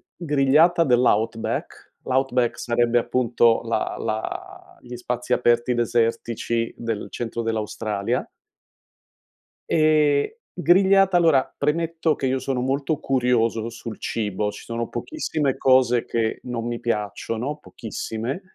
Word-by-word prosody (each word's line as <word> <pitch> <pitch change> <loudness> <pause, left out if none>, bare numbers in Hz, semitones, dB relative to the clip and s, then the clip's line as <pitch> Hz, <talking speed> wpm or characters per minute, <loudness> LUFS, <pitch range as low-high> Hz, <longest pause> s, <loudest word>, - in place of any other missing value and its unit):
grigliata 155 +2 +3
dell' 125 -2 +3
outback. 110 +1 -1
L' - - -4
outback 130 -2 +1
sarebbe 120 0 +1
appunto 120 -1 +2
la 115 - -1
la 110 -1 -4 0.2
gli 125 0 -9
spazi 125 0 -2
aperti 120 0 +2
desertici 115 0 0
del 110 -3 -4
centro 115 0 -4
dell'Australia. 110 -2 -2 1.4
Ehm, 155 -2 +3 0.3
grigliata 190 +2 +4
allora, 160 -6 +3
premetto 160 +2 0
che 135 - -2
io 130 +1 +1
sono 130 -1 -2
molto 140 +3 -1
curioso 120 -3 +1
sul 115 -1 -8
cibo, 105 -1 -2
ci - - -11
sono 115 0 -4
pochissime 150 - -2
cose 130 -3 +3
che 115 -1 -1
non 120 -1 -4
mi 120 0 -3
piacciono, 115 +5 -3
pochissime, 115 - -5
120 Hz, 115 wpm, -23 LUFS, 115-140 Hz, 1.4 s, grigliata